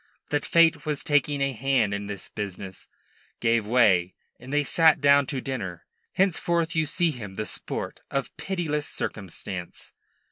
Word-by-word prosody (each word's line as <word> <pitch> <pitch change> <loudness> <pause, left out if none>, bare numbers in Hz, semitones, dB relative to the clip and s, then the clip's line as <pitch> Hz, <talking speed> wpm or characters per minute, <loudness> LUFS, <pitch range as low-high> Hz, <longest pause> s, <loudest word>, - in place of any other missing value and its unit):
that 145 0 0
Fate 165 -3 +4
was 150 -2 -2
taking 145 -1 +1
a 135 0 +1
hand 125 -4 +1
in 100 0 -4
this 100 -1 -6
business, 95 -2 -7 0.5
gave 115 -2 +1
way, 95 -7 +3 0.2
and 125 +2 -10
they 150 0 +2
sat 160 +2 +5
down 140 -1 +5
to 135 - -2
dinner. 95 -11 -5 0.3
Henceforth 170 -3 +1
you 160 -1 +2
see 170 +2 +1
him 105 -8 -8
the 110 - -3
sport - - -4
of 135 -1 -3
pitiless 160 -3 -2
circumstance. 95 -2 -5
135 Hz, 150 wpm, -26 LUFS, 105-150 Hz, 0.5 s, sat